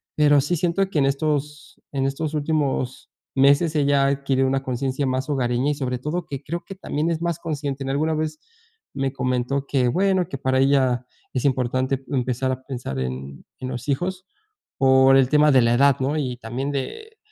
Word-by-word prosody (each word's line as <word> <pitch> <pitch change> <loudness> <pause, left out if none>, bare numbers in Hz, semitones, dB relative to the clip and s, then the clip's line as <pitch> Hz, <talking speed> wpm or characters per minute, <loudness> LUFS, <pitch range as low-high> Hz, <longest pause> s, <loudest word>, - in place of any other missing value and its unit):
Pero 145 -1 +5
sí, 150 +6 0
siento 180 +4 0
que 160 - 0
en 135 - +3
estos 150 +1 -2
en 135 -1 -1
estos 145 +3 -2
últimos 145 -4 -1 0.3
meses 140 +4 +4
ella 140 -2 +3
ha - - +3
adquirido 135 -1 +1
una 135 0 0
conciencia 130 +2 -2
más 130 +3 -2
hogareña 130 0 +1
y, - - -2
sobre 125 -3 -3
todo, 155 +7 -3
que 140 -1 -5
creo 170 +4 -4
que 195 - -8
también 160 -4 -2
es 165 -1 -2
más 170 -2 -1
consciente. 145 -4 -4
En 135 - -4
alguna 155 +3 0
vez 155 0 -3 0.5
me 135 -1 -1
comentó 130 +1 -1
que, 130 -3 +1
bueno, 185 +3 +1
que 140 - -4
para 130 0 +1
ella 130 -3 +2 0.3
es 130 - -1
importante 130 0 0
empezar 130 0 0
a 130 0 -7
pensar 125 - -5
en 65 +2 -5 0.2
en 130 - -5
los 125 0 -6
hijos 180 +6 -2 0.5
por 135 0 +6
el 135 -1 +4
tema 150 0 +5
de 130 -2 +6
la 115 0 +3
edad, 140 +1 +4
¿no? 135 +3 0
Y 130 -5 -2
también 125 +4 -4
de 440 - -5
135 Hz, 195 wpm, -23 LUFS, 130-150 Hz, 0.5 s, por